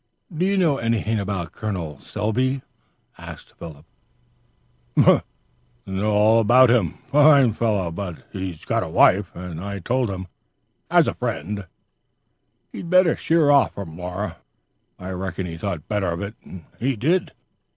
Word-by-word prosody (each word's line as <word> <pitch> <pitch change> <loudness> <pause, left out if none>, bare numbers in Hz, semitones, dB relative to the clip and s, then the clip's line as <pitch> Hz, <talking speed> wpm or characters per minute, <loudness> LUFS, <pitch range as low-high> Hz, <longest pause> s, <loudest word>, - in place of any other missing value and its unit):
"Do 180 +4 +1
you 200 0 +1
know 160 -7 +3
anything 115 -1 0
about 100 -3 -3
a - - -16
Col. 90 -10 -5
Selby?" 130 - -1 2.4
"Know - - +6 0.6
all 105 +3 +2
about 120 +3 +6
him. 105 -10 +2 0.2
Fine 145 -5 +6
fellow. 105 -6 0
But 90 -1 -6
he's 95 -5 -6
got - - 0
a - - -4
wife; 95 -1 +4
and 85 -1 -7
I 100 0 -4
told 125 +5 -1
him, 95 -1 -5 0.6
as - - +4
a - - 0
friend, 100 0 -4 1.0
he'd 170 - -7
better 185 -2 +5
sheer 160 -3 +2
off 140 -4 +4
from 85 -6 -7
Laura. 90 +1 -5 0.6
I 90 +1 -7
reckon 95 0 -4
he 85 -2 -6
thought 85 -3 -5
better 105 -3 -1
of 85 - -5
it 100 +1 -5
and 90 -4 -11 0.3
did." 170 - +1
105 Hz, 140 wpm, -22 LUFS, 90-125 Hz, 2.4 s, Know